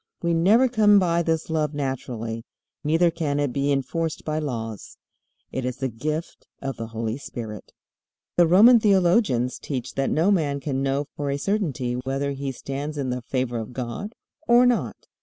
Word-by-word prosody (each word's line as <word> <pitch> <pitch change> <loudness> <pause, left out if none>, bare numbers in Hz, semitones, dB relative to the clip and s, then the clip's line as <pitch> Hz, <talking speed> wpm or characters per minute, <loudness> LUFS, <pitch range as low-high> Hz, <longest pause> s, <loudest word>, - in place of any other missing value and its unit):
We 170 0 +2
never 205 +10 +5
come 215 -4 +5
by 170 -3 +3
this 160 -1 -1
love 155 -2 -1
naturally, 120 -5 -4 0.4
neither 165 +3 +3
can 150 -4 -1
it 145 -4 0
be 140 +1 +1
enforced 155 +4 -2
by 155 0 -1
laws. 115 -8 -5 0.5
It 130 - -3
is 125 0 -3
the 135 -1 -2
gift 155 +8 -4
of 135 -1 -4
the 115 - -5
Holy 115 +2 -3
Spirit. 115 -6 -7 0.6
The 175 -1 +5
Roman 220 +8 +7
theologians 185 - +2
teach 130 -5 -4
that 135 0 0
no 165 +6 +2
man 150 -7 +1
can 135 -1 -2
know 135 +1 0
for 145 -1 -3
a 140 - 0
certainty 145 - -1
whether 135 +3 -2
he 140 0 -3
stands 140 +3 -5
in 135 -3 -2
the 125 0 -3
favor 120 -1 -2
of 110 +2 -7
God 130 - -5 0.3
or 240 +1 +6
not. 245 -2 0
140 Hz, 175 wpm, -24 LUFS, 125-170 Hz, 0.6 s, Roman